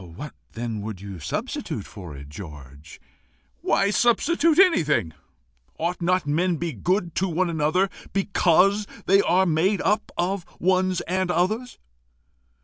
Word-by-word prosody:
"What 150 +9 -7 0.2
then 115 -2 -4
would 105 -2 -6
you 100 -2 -8
substitute 75 - -4
for 85 -7 -10
it, 70 +1 -10
George?" 75 -2 -11 0.6
"Why 195 - +2
substitute 300 +9 +3
anything? 150 - +3 0.6
Ought 175 +2 -2
not 180 0 +1
men 170 +5 +1
be 165 0 -3
good 175 - -1
to 190 - +1
one 175 +1 0
another 160 +5 +2 0.2
because 195 +1 +3 0.2
they 195 +1 +5
are 185 0 +3
made 175 +4 +2
up 210 +2 0
of 185 +1 -1 0.2
ones 185 0 +2
and 185 +1 -1
others? 215 +9 0
175 Hz, 135 wpm, -24 LUFS, 120-195 Hz, 0.6 s, they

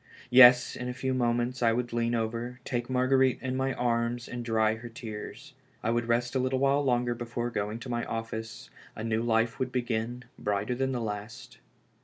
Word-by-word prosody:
Yes, 125 0 +8
in 125 0 -4
a 125 - -5
few 130 0 -1
moments 120 0 0
I 115 -1 +4
would 120 0 -2
lean 120 0 +1
over, 115 +2 -3
take 120 -1 -2
Marguerite 130 0 +3
in 130 -1 -3
my 135 0 0
arms, 120 0 -1
and 120 -1 -5
dry 110 -1 +2
her 115 +2 -8
tears. 115 +4 -8 0.3
I 115 - +1
would 120 0 0
rest 120 +1 +1
a 130 - +1
little 130 +1 0
while 140 +2 +2
longer 120 -2 +1
before 120 0 -4
going 105 0 -2
to 130 - -7
my 120 -1 -1
office; 115 -1 -6 0.2
a 110 - -6
new 115 0 0
life 115 0 +1
would 130 -1 -1
begin, 120 -1 -2 0.2
brighter 105 +3 -1
than 130 +2 -1
the 125 -2 -2
last. 105 - -6
120 Hz, 195 wpm, -29 LUFS, 115-125 Hz, 0.3 s, Yes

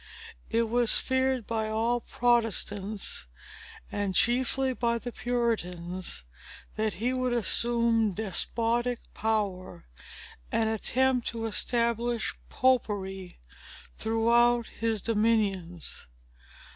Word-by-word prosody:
It 230 0 +1
was 240 0 +3
feared 260 -2 0
by 220 -1 -2
all 230 +3 +1
Protestants, 215 - 0 0.6
and 200 -2 -2
chiefly 260 +3 +2
by 235 -1 0
the 245 +1 -6
Puritians, 185 - -2 0.5
that 215 0 0
he 245 +3 -1
would 255 -1 0
assume 235 -1 +3
despotic 230 +5 0 0.2
power, 200 - -2 0.7
and 225 - +1
attempt 250 +3 +1
to 230 -1 -3
establish 235 +1 0 0.2
Popery 200 -7 0 0.6
throughout 235 +1 +3
his 225 -3 -2
dominions. 205 - 0
230 Hz, 90 wpm, -28 LUFS, 210-240 Hz, 0.7 s, was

